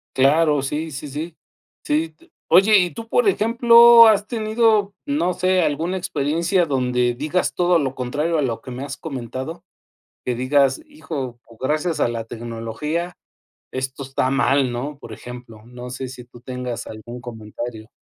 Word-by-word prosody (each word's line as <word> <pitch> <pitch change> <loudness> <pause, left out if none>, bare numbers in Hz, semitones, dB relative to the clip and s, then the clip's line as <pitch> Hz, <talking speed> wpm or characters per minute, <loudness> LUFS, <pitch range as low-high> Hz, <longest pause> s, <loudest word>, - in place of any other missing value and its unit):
Claro. 150 +2 +4
Sí, 150 +4 -3
sí, 140 +1 -6
sí, 155 +4 -6 0.5
sí. 155 +2 0 0.3
Oye, 195 +5 +6
y 180 -2 +1
tú, 230 -1 -8
por 485 - +2
ejemplo, 235 - +7
¿has 210 -2 +4
tenido, 220 -3 +1
no 285 -11 0
sé, 185 +1 +2
alguna 165 +4 -1
experiencia 170 +3 0
donde 125 -4 0
digas 150 +8 -1
todo 175 0 +3
lo 135 -4 -1
contrario 150 +6 -1
a - - +2
lo 120 -5 -1
que 130 - -9
me 125 +2 -6
has 140 0 -6
comentado? 135 +3 -6 0.6
Que 125 - -1
digas, 135 - +2
hijo, 145 - -6
pues 115 -1 -19
gracias 155 +5 -1
a - - +3
la 115 -1 -4
tecnología, 120 +10 -4 0.6
esto 130 +1 -4
está 130 -1 -1
mal, 135 -1 +2
¿no? 140 +4 -5
Por 115 - -11
ejemplo, 120 -1 -10
no 125 +1 -9
sé 130 +1 -5
si 125 -1 -10
tú 120 0 -16
tengas 125 -1 -5
algún 115 +3 -9
comentario 110 -1 -7
140 Hz, 160 wpm, -21 LUFS, 125-175 Hz, 0.6 s, ejemplo